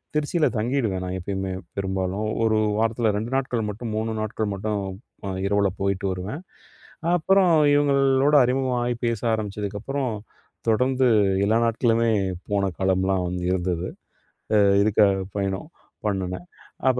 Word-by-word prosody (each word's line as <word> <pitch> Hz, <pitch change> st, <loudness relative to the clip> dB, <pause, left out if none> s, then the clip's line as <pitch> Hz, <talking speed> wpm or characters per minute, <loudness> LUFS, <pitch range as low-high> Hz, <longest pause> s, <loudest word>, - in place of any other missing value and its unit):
திருச்சியில 150 Hz, +2 st, +1 dB
தங்கிடுவேன் 110 Hz, -5 st, 0 dB
நான் 90 Hz, +1 st, -3 dB
எப்பயுமே 95 Hz, +1 st, -3 dB, 0.3 s
பெரும்பாலும். 95 Hz, +1 st, -2 dB, 0.2 s
ஒரு 110 Hz, -1 st, +3 dB, 0.2 s
வாரத்தில 115 Hz, 0 st, +1 dB
2 115 Hz, +4 st, -4 dB
நாட்கள் 125 Hz, -5 st, -1 dB
மட்டும் 110 Hz, +2 st, -5 dB
3 110 Hz, +1 st, -1 dB
நாட்கள் 110 Hz, -1 st, -2 dB
மட்டும் 105 Hz, +1 st, -2 dB, 0.5 s
அ -, -, -2 dB, 0.2 s
இரவில 100 Hz, -1 st, +2 dB
போயிட்டு 100 Hz, 0 st, -1 dB
வருவேன். 95 Hz, -, -5 dB, 0.7 s
அப்பறம் 185 Hz, +1 st, +4 dB, 0.2 s
இவங்களோட 140 Hz, 0 st, +3 dB
அறிமுக 130 Hz, +1 st, +1 dB
ஆயி 120 Hz, 0 st, -1 dB
பேச 115 Hz, -3 st, -1 dB
ஆரம்பிச்சதுக்கப்பறம் 105 Hz, +5 st, -3 dB, 0.6 s
தொடர்ந்து 130 Hz, +3 st, +2 dB, 0.4 s
எல்லா 110 Hz, +2 st, +3 dB
நாட்களுமே 115 Hz, 0 st, +2 dB, 0.4 s
போன 100 Hz, -1 st, +1 dB
காலம்லாம் 95 Hz, 0 st, +1 dB
வந்து 90 Hz, 0 st, -3 dB
இருந்தது. 90 Hz, -1 st, -1 dB, 0.7 s
அ -, -, +6 dB, 0.3 s
இதுக்காக, 105 Hz, -2 st, +4 dB, 0.2 s
பயணம் 100 Hz, -, -2 dB, 0.4 s
பண்ணுனேன். 95 Hz, -, -3 dB, 0.4 s
அப்ப 125 Hz, -1 st, +1 dB
110 Hz, 125 wpm, -24 LUFS, 95-125 Hz, 0.7 s, அ